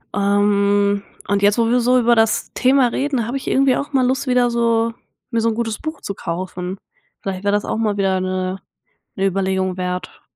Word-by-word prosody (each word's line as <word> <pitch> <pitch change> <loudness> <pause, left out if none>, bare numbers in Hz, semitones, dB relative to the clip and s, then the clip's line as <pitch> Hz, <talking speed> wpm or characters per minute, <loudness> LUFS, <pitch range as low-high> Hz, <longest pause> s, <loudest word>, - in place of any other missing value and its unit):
Ähm, 200 0 +2 0.2
und 200 0 +1
jetzt, 205 +2 +4
wo 230 -1 +2
wir 250 +1 +3
so 250 +1 +4
über 240 0 +4
das 225 -1 +1
Thema 260 0 +3
reden, 265 -3 -1
habe 245 - -3
ich - - -9
irgendwie 270 -1 +3
auch 285 - -4
mal 260 -2 +3
Lust, 265 +2 -1
wieder 250 -1 +3
so 230 -1 +1 0.4
mir 230 -1 +1
so 230 - +2
'n 220 - -2
gutes 225 -2 -2
Buch 315 +1 -5
zu 200 - -4
kaufen. 180 +2 -5 0.4
Vielleicht 190 -1 -4
wäre 200 - +2
das 205 0 0
auch - - -2
mal 215 -2 0
wieder 190 -1 +1
'ne 185 0 -2 0.6
'ne 195 - 0
Überlegung 190 -1 0
wert. 180 0 -4
210 Hz, 205 wpm, -20 LUFS, 195-240 Hz, 0.6 s, jetzt